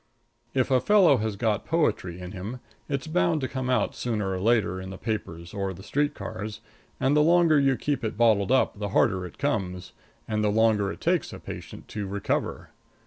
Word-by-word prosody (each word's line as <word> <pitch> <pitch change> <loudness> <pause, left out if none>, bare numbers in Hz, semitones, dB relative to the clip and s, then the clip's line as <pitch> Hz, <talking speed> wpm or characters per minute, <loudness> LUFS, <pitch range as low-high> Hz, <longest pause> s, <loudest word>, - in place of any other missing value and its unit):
If 130 0 +1
a 130 -1 +4
fellow 190 -5 +5
has 110 -2 -2
got 105 0 0
poetry 105 - 0
in 90 0 -7
him 105 +6 -6 0.3
it's 140 0 -2
bound 160 0 +1
to 130 - -1
come 130 0 -3
out 125 - +1
sooner 105 -5 -2
or 95 - -2
later 105 -3 +2
in 95 - -7
the 95 - -7
papers 85 -6 -4
or 95 -2 -3
the 95 - -12
street 145 +6 0
cars; 105 0 -6 0.4
and 135 +2 +2
the 150 - +5
longer 165 -1 +5
you 135 -2 +3
keep 140 -3 -2
it 110 -2 -3
bottled 110 -3 +3
up 130 -5 +2
the 105 -1 -2
harder 95 -1 +2
it - - -15
comes, 95 -11 -2 0.4
and 110 -1 0
the 105 - +3
longer 105 -2 +3
it - - -10
takes - - +1
the - - -8
patient - - -9
to 105 -2 -4
recover. 100 +1 -2
110 Hz, 200 wpm, -26 LUFS, 100-135 Hz, 0.4 s, fellow